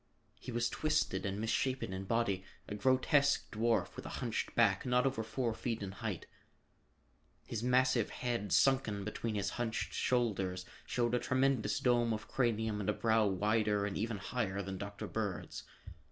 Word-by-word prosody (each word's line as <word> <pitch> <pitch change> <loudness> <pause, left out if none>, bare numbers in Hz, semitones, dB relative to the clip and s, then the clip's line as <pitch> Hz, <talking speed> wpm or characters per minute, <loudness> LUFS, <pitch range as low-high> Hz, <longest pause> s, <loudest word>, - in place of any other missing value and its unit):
He 125 - -7
was 120 0 +1
twisted 155 -11 0
and 100 +1 -3
misshapen 115 -1 0
in 95 +1 -4
body, 100 -4 0 0.2
a - - -5
grotesque 130 +6 +2
dwarf 115 +1 +1
with - - -7
a - - -5
hunched 115 -2 -2
back, 100 -5 +4
not 125 0 +2
over 130 -4 0
four 115 +2 -1
feet 115 -1 -3
in 95 - -4
height. 95 - -4 1.2
His 110 - -4
massive 125 -1 +3
head, 120 -6 -3
sunken 130 -6 +3
between 110 +1 -3
his 100 -1 -1
hunched 115 0 -2
shoulders, 100 -7 0 0.2
showed 120 -1 0
a 125 - +3
tremendous 130 -2 +1
dome 120 -2 +3
of 110 - -5
cranium 110 -4 0
and 95 - -1
a - - +3
brow 110 -1 +3
wider 105 +1 +1
and 100 - -3
even 110 0 -2
higher 100 -2 -2
than 95 0 -5
Dr. 100 0 -5
Bird's. 100 -7 -4
110 Hz, 165 wpm, -34 LUFS, 100-125 Hz, 1.2 s, back